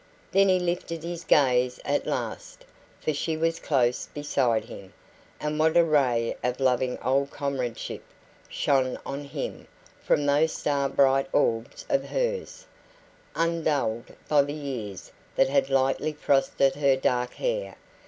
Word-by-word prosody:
Then 195 Hz, 0 st, +4 dB
he 185 Hz, -, +5 dB
lifted 175 Hz, -2 st, -3 dB
his 170 Hz, 0 st, -5 dB
gaze 125 Hz, -3 st, +3 dB
at -, -, 0 dB
last, -, -, -4 dB, 0.3 s
for 155 Hz, -, -1 dB
she 155 Hz, +2 st, -2 dB
was 165 Hz, +1 st, 0 dB
close 125 Hz, -4 st, +1 dB
beside 130 Hz, -6 st, 0 dB
him. 95 Hz, -1 st, -11 dB, 0.5 s
And 150 Hz, 0 st, -2 dB
what 160 Hz, +1 st, +3 dB
a 170 Hz, -, +7 dB
ray 130 Hz, -7 st, +2 dB
of 125 Hz, +1 st, -1 dB
loving 130 Hz, -1 st, +1 dB
old 135 Hz, +2 st, +1 dB
comradeship 130 Hz, -5 st, -4 dB, 0.5 s
shone 130 Hz, -3 st, +1 dB
on 140 Hz, +1 st, -5 dB
him 140 Hz, -, -6 dB, 0.4 s
from 145 Hz, -, +2 dB
those 145 Hz, +3 st, +3 dB
star 140 Hz, -2 st, 0 dB
bright 135 Hz, 0 st, +3 dB
orbs 115 Hz, -5 st, 0 dB
of 275 Hz, -3 st, +1 dB
hers, -, -, -2 dB, 0.7 s
undulled 155 Hz, -8 st, -1 dB
by 150 Hz, -2 st, +5 dB
the 145 Hz, +1 st, -3 dB
years 125 Hz, -10 st, -6 dB, 0.2 s
that 135 Hz, -, +3 dB
had 135 Hz, -1 st, +2 dB
lightly 135 Hz, +3 st, +1 dB
frosted 135 Hz, -1 st, +2 dB
her 140 Hz, -2 st, +4 dB
dark 125 Hz, -1 st, 0 dB
hair. -, -, -2 dB
140 Hz, 140 wpm, -26 LUFS, 130-160 Hz, 0.7 s, a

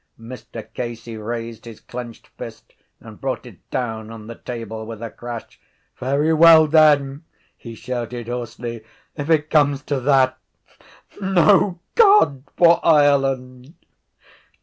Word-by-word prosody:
Mr 115 Hz, -1 st, -10 dB
Casey 115 Hz, -1 st, -6 dB
raised 115 Hz, +1 st, -6 dB
his 115 Hz, -2 st, -11 dB
clenched 120 Hz, -2 st, -9 dB
fist -, -, -11 dB, 0.3 s
and -, -, -13 dB
brought -, -, -3 dB
it -, -, -16 dB
down 110 Hz, -3 st, -4 dB
on 115 Hz, -1 st, -10 dB
the 115 Hz, -, -8 dB
table 115 Hz, -2 st, -7 dB
with 110 Hz, -1 st, -8 dB
a 115 Hz, -1 st, -6 dB
crash. 120 Hz, -1 st, -9 dB, 0.4 s
—Very 140 Hz, +5 st, +1 dB
well 160 Hz, 0 st, +7 dB
then, 150 Hz, -2 st, +3 dB, 0.3 s
he 115 Hz, -1 st, -11 dB
shouted 120 Hz, 0 st, -5 dB
hoarsely, 120 Hz, -1 st, -6 dB, 0.3 s
if 145 Hz, 0 st, -5 dB
it 155 Hz, -2 st, +2 dB
comes 145 Hz, -2 st, +2 dB
to 140 Hz, -2 st, -2 dB
that, 130 Hz, -1 st, +2 dB, 0.8 s
no 190 Hz, -1 st, +3 dB
God 405 Hz, -, +5 dB, 0.2 s
for 170 Hz, -1 st, +5 dB
Ireland! 135 Hz, -2 st, +2 dB
130 Hz, 125 wpm, -21 LUFS, 115-150 Hz, 0.8 s, well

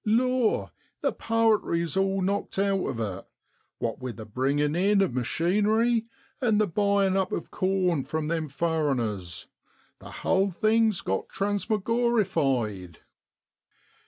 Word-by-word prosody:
Law! 245 Hz, +2 st, +1 dB, 0.3 s
the -, -, 0 dB
powetry's 215 Hz, -8 st, +1 dB
all 195 Hz, 0 st, +1 dB
knocked 200 Hz, +1 st, -2 dB
out 195 Hz, -1 st, +1 dB
of 115 Hz, -, -4 dB
it, 100 Hz, -4 st, -4 dB, 0.5 s
what 115 Hz, -1 st, -3 dB
wi' 130 Hz, -, -4 dB
the 110 Hz, 0 st, -9 dB
bringin' 140 Hz, +6 st, 0 dB
in 200 Hz, +3 st, +3 dB
of 195 Hz, -9 st, +2 dB
machinery, 210 Hz, -, +1 dB, 0.3 s
and 220 Hz, -4 st, +3 dB
the 215 Hz, -, +4 dB
buyin' 200 Hz, +1 st, +1 dB
up 190 Hz, -1 st, 0 dB
of -, -, -4 dB
corn 185 Hz, -5 st, +1 dB
from 160 Hz, +1 st, -3 dB
them 160 Hz, -2 st, -2 dB
furriners, 135 Hz, -, -1 dB, 0.5 s
the -, -, -11 dB
hull -, -, 0 dB
(whole) 195 Hz, +1 st, +3 dB
thing's 215 Hz, +2 st, +2 dB
got 95 Hz, 0 st, -2 dB
transmorgorified. 195 Hz, -, 0 dB
190 Hz, 130 wpm, -27 LUFS, 140-210 Hz, 0.5 s, the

